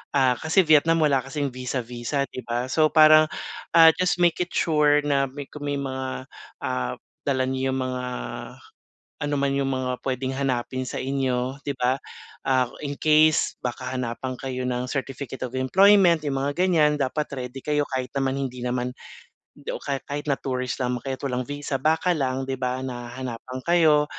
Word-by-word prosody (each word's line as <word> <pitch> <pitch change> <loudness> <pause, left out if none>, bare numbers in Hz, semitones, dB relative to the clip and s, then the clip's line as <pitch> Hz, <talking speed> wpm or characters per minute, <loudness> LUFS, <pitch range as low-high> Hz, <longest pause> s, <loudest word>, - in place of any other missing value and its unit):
ah, 130 -2 +4
kasi 175 +4 +3
Vietnam 160 +1 +4
wala 140 -3 +3
kasing 140 +1 -3
visa-visa, 125 +1 -3
'di 130 - -8
ba? 120 +2 -2
So, 155 -1 +4
parang, 155 0 +7 0.5
ah, 165 -1 +9
just 180 -1 +2
make 175 0 +3
it 175 0 -3
sure 150 -2 +3
na 140 -2 +1
may 140 +2 -7
kung 145 -1 -6
may 145 - 0
mga, 130 -1 -4 0.3
ah 65 0 -2 0.3
dala 130 -2 +2
niyo 130 0 -1
yung 130 - -1
mga 125 0 -3 1.2
ano 145 - -1
man 140 0 +1
yung 135 -1 0
mga 125 -1 -2
pwedeng 130 0 -2
hanapin 130 -1 -1
sa - - -4
inyo, 130 0 -1
'di 140 -1 -2
ba? 125 +1 +2 0.5
Ah, 130 -2 +2 0.2
in 145 - -2
case 155 0 +4
baka 125 -2 -3
hanapan 125 +1 -3
kayo 130 -1 -4
ng 125 0 -1
certificate 135 0 -5
of 125 +1 -7
employment, 180 +5 +5
yung 135 - -1
mga 140 +1 0
ganiyan. 155 -5 +4
Dapat 145 +3 0
ready 130 0 -5
kayo 150 -1 0
kahit 130 -1 -3
naman 135 -1 0
hindi 130 -2 -4
naman 125 0 -2 0.6
hindi - - -6
o - - -5
ka 140 -1 -2
kahit 145 +1 -5
na 140 - +2
tourist 130 -2 -3
lamang 125 -1 -1
kayo 135 0 -4
at - - -10
walang 125 -2 -1
visa, 145 -1 -3
baka 160 +5 +2
lang, 135 -4 -1
'di 130 0 -3
ba, 130 +1 -2
na 120 -2 -5
hanapan 130 0 -6
kayo, 160 -4 +4
135 Hz, 180 wpm, -24 LUFS, 130-150 Hz, 1.2 s, ah